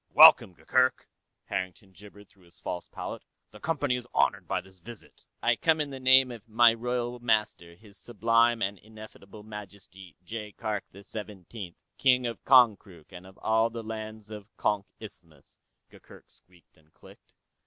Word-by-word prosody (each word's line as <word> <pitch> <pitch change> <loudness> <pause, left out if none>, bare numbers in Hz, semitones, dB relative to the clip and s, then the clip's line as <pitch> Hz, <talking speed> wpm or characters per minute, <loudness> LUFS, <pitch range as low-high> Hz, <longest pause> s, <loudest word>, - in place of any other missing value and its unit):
"Welcome, 90 - +8
Gurgurk," 130 +6 +1 0.4
Harrington 95 +1 -5
gibbered 105 +1 -15
through 95 -2 -25
his 85 - -20
false 90 - -5
palate. - - -7 0.3
"The 105 - -14
Company 145 -2 -1
is 125 -1 -6
honored - - +1
by - - -1
this 95 0 -16
visit." 115 +4 -14 0.2
"I - - +3
come 160 -1 +2
in 145 -2 -2
the 135 - -7
name 130 0 +5
of 115 -1 -11
my 115 +1 +6
royal 120 +1 -3
master, 105 -7 -1
His 105 +1 -9
Sublime 115 +1 +2
and 100 0 -3
Ineffable 110 -1 -13
Majesty, 100 -3 -12
Jaikark 105 0 -5
the 100 +2 -14
Seventeenth, 100 -3 -9 0.2
King 125 -2 +3
of 115 -1 -5
Konkrook 105 - +3
and 90 0 -11
of 95 - -17
all 110 +1 +2
the 115 0 -7
lands 110 -1 -8
of 105 -2 -8
the - - -42
Konk 105 -2 0
Isthmus," - - -15 0.3
Gurgurk - - -17
squeaked 90 -1 -24
and 80 0 -28
clicked. - - -19
110 Hz, 165 wpm, -28 LUFS, 95-120 Hz, 0.4 s, Welcome